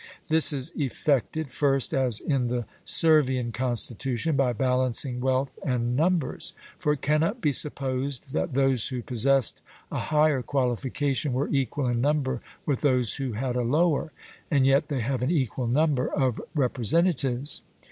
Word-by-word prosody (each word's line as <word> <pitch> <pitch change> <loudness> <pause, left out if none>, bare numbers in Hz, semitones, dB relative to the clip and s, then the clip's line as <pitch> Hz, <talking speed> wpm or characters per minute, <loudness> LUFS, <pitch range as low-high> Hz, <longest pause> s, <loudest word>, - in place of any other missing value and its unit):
This 160 0 +5
is 135 -3 -2
effected, 140 +1 -1
first 135 0 +2
as 125 -5 +2
in 135 -5 -1
the 120 -1 -2 0.2
Servian 130 -7 +3
constitution, 125 +4 -1
by 135 -2 +2
balancing 125 +1 0
wealth 130 +1 0
and 125 -2 -1
numbers; 165 +1 0 0.3
for 150 - +1
it 150 - -7
cannot 160 - +1
be 150 -9 +1
supposed 135 -1 0
that 140 - -2
those 135 -4 +3
who 125 -3 -4
possessed 130 +1 +2 0.3
a - - -2
higher 150 -3 +2
qualification 135 +2 -1
were 135 +3 -1
equal 140 0 -1
in 120 -1 0
number 140 -3 0 0.2
with 140 -4 -1
those 125 -5 +2
who 135 -4 -3
had 125 +3 -3
a 125 - 0
lower, 155 +5 +1 0.4
and 140 -3 +2
yet 135 +3 +3
they 140 -4 -2
have 130 +2 -2
an 125 - 0
equal 130 -6 -1
number 140 +1 +1
of 130 -4 -1
representatives. 135 - 0
135 Hz, 150 wpm, -26 LUFS, 125-145 Hz, 0.4 s, This